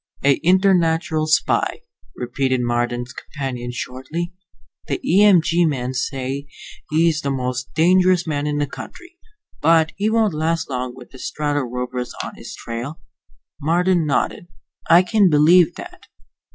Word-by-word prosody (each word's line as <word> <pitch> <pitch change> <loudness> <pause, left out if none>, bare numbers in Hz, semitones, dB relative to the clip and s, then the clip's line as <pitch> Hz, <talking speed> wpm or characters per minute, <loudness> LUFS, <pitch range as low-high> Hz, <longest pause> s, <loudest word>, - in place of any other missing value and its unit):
"A 140 0 +3
internatural 165 -3 +2
spy," 155 - +1 0.3
repeated 130 +1 -1
Marden's 120 0 -2
companion, 130 -4 -6
shortly. 130 +8 -5 0.5
"The - - -2
E 190 +4 +4
M 190 -6 +6
G 170 +2 +2
men 130 -5 -1
say 135 +1 -3 0.4
he's 160 0 +2
the 140 - -2
most 125 -2 -3
dangerous 180 +1 +4
man 150 -2 -2
in 150 0 -1
the 145 - +1
country. 350 - -11 0.4
But 160 -1 +4
he 205 +2 0
won't 220 -4 +2
last 160 0 -1
long 125 -1 -3
with 125 -2 -14
the 130 - -13
Strato 145 +1 -2
Rovers 125 -1 -4
on - - -7
his - - -10
trail." 120 +7 -6 0.6
Marden 175 +2 +2
nodded. 150 +4 -1 0.4
"I 170 +2 +7
can 200 0 +3
believe 160 +3 +5
that. - - -11
150 Hz, 140 wpm, -20 LUFS, 130-170 Hz, 0.6 s, I